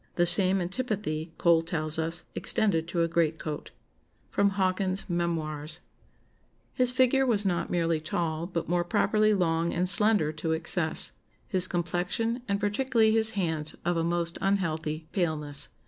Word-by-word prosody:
The 175 - +3
same 190 +2 +3
antipathy, 180 -6 -3
Cole 170 -1 +4
tells 160 -2 -1
us, 165 +1 -2
extended 165 -7 +1
to 170 0 0
a - - +1
greatcoat." 160 -2 -2 0.7
[Sidenote: 200 0 +2
Hawkins's 190 0 -1
Memoirs.] 160 -2 -3 0.9
"His 250 -1 +4
figure 260 +1 +3
was 220 -6 +1
not 175 -3 -1
merely 165 -2 0
tall, 160 +1 -3
but 170 -3 -4
more 175 0 +1
properly 215 +4 +2
long 170 -4 0
and 180 +2 0
slender 205 -5 +3
to 160 +1 -3
excess; 160 0 +2 0.4
his 185 -1 +4
complexion, 180 +8 -2
and 200 -1 -1
particularly 220 +1 +1
his 220 0 +6
hands, 160 -5 -1
of 175 0 +1
a 165 - 0
most 170 0 -2
unhealthy 160 -5 -1
paleness. 150 -6 -2
175 Hz, 145 wpm, -27 LUFS, 160-200 Hz, 0.9 s, his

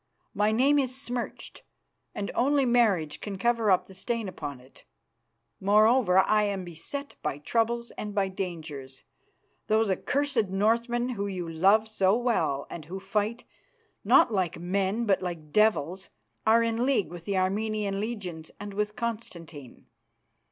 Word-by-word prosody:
My 210 +1 +2
name 275 +6 +4
is 260 -1 -1
smirched, 245 -3 -5 0.5
and 200 - -3
only 275 +2 +2
marriage 215 -11 +2
can 200 -2 -5
cover 230 +1 +1
up 185 -2 +4
the 190 - -14
stain 230 +3 -3
upon 145 -7 -6
it. 130 +2 -19 0.8
Moreover, 210 0 +4
I 210 +3 +4
am 195 -2 -2
beset 175 - -6
by - - -2
troubles 235 +8 -1
and 210 0 -5
by 200 -1 +2
dangers. 160 -8 -6 0.6
Those 215 -1 +2
accursed 265 +2 0
Northmen, 235 +5 +1
who 200 -6 -3
love 190 +7 +4
you - - -16
so 210 -2 +2
well 230 - 0
and 155 - -8
who 185 +5 -6
fight, 210 +4 -2 0.6
not 230 - +5
like 185 -4 0
men 195 +5 0
but 195 -3 +2
like 170 -4 -5
devils, 190 -3 +2 0.4
are 230 +1 +5
in 230 +1 0
league 255 -9 +1
with 175 -1 -9
the 200 -2 -1
Armenian 200 +1 0
legions 190 -8 -5
and 205 0 -7
with 210 +1 -2
Constantine. 170 - -6
205 Hz, 145 wpm, -28 LUFS, 185-230 Hz, 0.8 s, not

